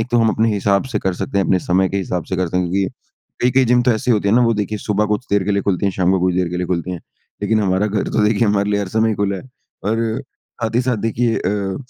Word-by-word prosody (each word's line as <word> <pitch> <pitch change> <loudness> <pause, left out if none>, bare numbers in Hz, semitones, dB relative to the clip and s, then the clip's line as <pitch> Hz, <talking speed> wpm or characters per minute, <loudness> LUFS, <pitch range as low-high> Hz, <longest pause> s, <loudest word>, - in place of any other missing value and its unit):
एक 110 - -2
तो 120 - +2
हम 115 -1 +3
अपने 110 +1 +2
हिसाब 100 +1 +1
से 105 - +1
कर 95 -2 -1
सकते 100 - -2
हैं 95 - +2
अपने 95 - +2
समय 95 +2 +1
के 100 - -3
हिसाब 90 -3 -2
से 95 - -2
करते 90 -1 -1
हैं 90 -1 0
क्योंकि 95 0 +1 0.5
कई-कई 125 +1 +4
जिम 120 +1 +3
तो 125 - +3
ऐसी 110 +3 -1
होती 105 -3 +2
हैं 105 - +3
ना 125 - +5
वो 115 -1 +3
देखिए 105 0 -2
सुबह 105 0 0
कुछ 105 +4 -2
देर 100 -1 +2
के 105 - 0
लिए 100 - 0
खुलती 100 0 0
है, 100 - 0
शाम 90 0 +1
को 95 - +1
कुछ 90 -1 +1
देर 90 -1 +1
के 90 - -4
लिए 90 0 -2
खुलती 90 0 -2
हैं। 90 - -6 0.4
लेकिन 110 +1 +2
हमारा 95 0 +1
घर 105 -1 -1
तो 110 - +1
देखिए 105 +1 +2
हमारे 100 0 +1
लिए 100 - +1
हर 100 - -3
समय 110 -1 +3
खुला 100 -1 -1
है। - - -8 0.4
और 115 +3 0 0.4
साथ 115 0 -1
ही 120 - +4
साथ 125 -2 0
देखिए 115 +2 0
अ, 95 0 -2
100 Hz, 295 wpm, -19 LUFS, 95-110 Hz, 0.5 s, ना